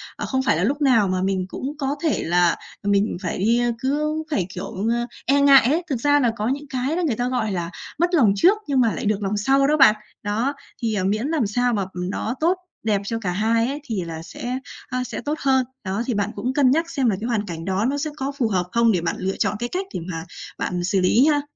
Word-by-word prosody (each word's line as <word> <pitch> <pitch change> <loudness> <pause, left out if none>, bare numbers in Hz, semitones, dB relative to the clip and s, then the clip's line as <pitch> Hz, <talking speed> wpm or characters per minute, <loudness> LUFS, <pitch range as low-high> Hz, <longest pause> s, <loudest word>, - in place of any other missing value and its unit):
À, - - -4
không 265 0 0
phải - - +2
là - - 0
lúc 285 +2 0
nào 235 -8 +4
mà 185 0 0
mình 190 -1 0
cũng 280 +3 -5
có 280 -1 -1
thể 315 - +1
là 175 0 +3 0.3
mình 200 0 +1
phải 180 - -3
đi 230 +5 +2 0.2
cứ 300 +4 -1
phải, 190 -10 0
kiểu, 190 +3 -4
a, 240 0 -1 0.2
e 280 +1 +3
ngại 275 -3 +7
ấy. 340 +3 +1
Thực 255 -5 -2
ra 290 +1 +4
là 240 -4 +2
có 210 +2 -1
những 285 +3 -2
cái 265 +4 -1
đó 360 - 0
người 255 - 0
ta, 245 +2 -1
gọi 245 -4 -1
là, 175 -3 -2 0.3
mất 345 +1 +2
lòng 230 - +5
trước 375 - +5
nhưng 275 -2 +2
mà 230 -4 +3
lại - - -4
được 210 0 0
lòng 200 +2 -1
sau 270 +5 +3
đó 305 +1 +3
bạn. 265 -7 +7 0.3
Đó, 225 +7 0 0.3
thì, 225 -2 0
à, 190 - 0
miễn 215 +7 0
làm 300 -9 +1
sao 245 +3 +1
mà 200 -3 0
nó 190 +7 -3
tốt 350 +4 +2 0.3
đẹp 210 -3 +1
cho 225 +2 -2
cả 185 -5 -2
hai 225 +4 +1
ấy 280 +3 -3
thì 215 -8 -2
là 160 -1 -6
sẽ, 250 +8 -5 0.3
a, 255 0 -2
sẽ - - -5
tốt 300 +2 -2
hơn. 265 -2 +2 0.2
Đó, 195 +3 -2
thì 250 - -1
bạn 205 0 -1
cũng 255 +2 -2
cân 265 -2 +4
nhắc 330 +3 +1
xem 260 -7 +1
là 200 - +1
cái 230 - -2
hoàn 220 -4 0
cảnh 165 -3 -6
đó 190 +3 0
nó 285 - -1
sẽ 310 +2 -2
có 275 0 -2
phù 240 -5 +2
hợp 185 -4 0
không 235 -1 +4
để 180 -5 +1
bạn 165 - -1
lựa 190 +1 -2
chọn - - +1
cái 240 0 -3
cách 380 +2 -2
để - - -2
mà 165 0 -4 0.3
bạn 180 -1 -2
xử 190 +1 +1
lý 225 +8 +4
ha. 295 -1 +3
235 Hz, 265 wpm, -22 LUFS, 200-275 Hz, 0.3 s, ngại